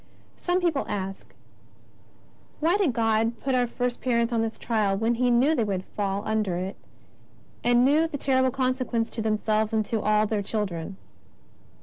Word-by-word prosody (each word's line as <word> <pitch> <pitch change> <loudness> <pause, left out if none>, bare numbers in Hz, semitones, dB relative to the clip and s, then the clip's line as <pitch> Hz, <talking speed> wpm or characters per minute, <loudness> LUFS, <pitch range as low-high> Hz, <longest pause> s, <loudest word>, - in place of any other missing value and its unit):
Some 355 +1 0
people 330 -6 +1
ask: 195 -2 -5 0.6
" - - -31
Why 330 +4 +2
did 395 -9 +2
God 225 0 +1
put 270 - -1
our 250 -1 +2
first 245 +1 -3
parents 235 -1 +1
to 230 - +1
this 225 0 -2
trial 210 -4 0
when 225 +3 +1
He 250 +1 +1
knew 250 +6 +4
they 250 -7 +1
would 195 -3 -2
fall 200 -1 -3
under 215 -4 0
it, 185 +3 -4 0.9
and 245 +1 +4
knew 305 +4 +4
the 300 - -5
terrible 260 -1 +2
consequence 255 -3 -1
to 225 - -4
them 215 -1 +1
selves 215 +1 0
and 215 -1 +1
to 220 0 -2
all 215 0 +3
their 215 -1 -1
children 195 -3 -3
230 Hz, 180 wpm, -26 LUFS, 210-255 Hz, 0.9 s, knew